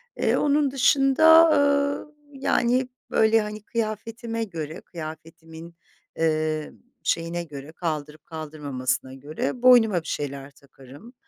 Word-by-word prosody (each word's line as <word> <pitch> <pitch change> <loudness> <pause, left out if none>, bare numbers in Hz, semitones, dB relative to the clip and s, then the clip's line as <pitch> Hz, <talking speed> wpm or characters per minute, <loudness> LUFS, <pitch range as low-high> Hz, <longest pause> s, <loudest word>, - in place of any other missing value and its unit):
E, - - +1
onun 290 -1 +2
dışında, 285 +5 +5
ııı, 285 0 +1 0.2
yani, 255 -1 +1 0.2
böyle, 220 0 +3
hani, 210 0 -6
kıyafetime 230 0 -4
göre 165 -4 -6
kıyafetimin, 165 0 -10 0.4
eee, 155 -1 -1 0.3
şeyine 170 +1 -1
göre 145 -1 -10
kaldırıp 155 -3 -5
kaldırmamasına 145 -5 -4
göre 145 - -5
boynuma 225 -8 +5
bir 160 - -13
şeyler 140 -1 -5
takarım. 140 - -16
170 Hz, 105 wpm, -24 LUFS, 155-245 Hz, 0.4 s, dışında